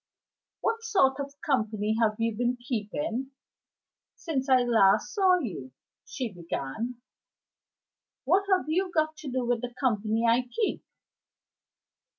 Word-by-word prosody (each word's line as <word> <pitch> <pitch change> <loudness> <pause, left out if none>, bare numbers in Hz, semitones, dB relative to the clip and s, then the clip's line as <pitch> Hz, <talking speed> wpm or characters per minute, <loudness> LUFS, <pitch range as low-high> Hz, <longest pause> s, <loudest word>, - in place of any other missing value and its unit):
"What 455 0 0
sort 380 -13 +2
of 280 0 -6
company 215 -5 0
have 215 -1 +3
you 225 -1 0
been 245 +2 0
keeping 260 +3 -3 0.8
since 280 -6 -3
I 255 -1 +5
last 220 -5 +3
saw 380 -3 +4
you?" 175 - -5 0.3
she 245 -6 -5
began. 175 - -4 1.3
"What 365 +9 +3
have 370 -1 +3
you 365 +4 +1
got 315 -1 +1
to 310 -2 -7
do 255 -1 -1
with 240 -1 0
the 245 -1 -6
company 225 -3 +1
I 240 +2 +3
keep?" 440 - -1
250 Hz, 130 wpm, -28 LUFS, 220-310 Hz, 1.3 s, I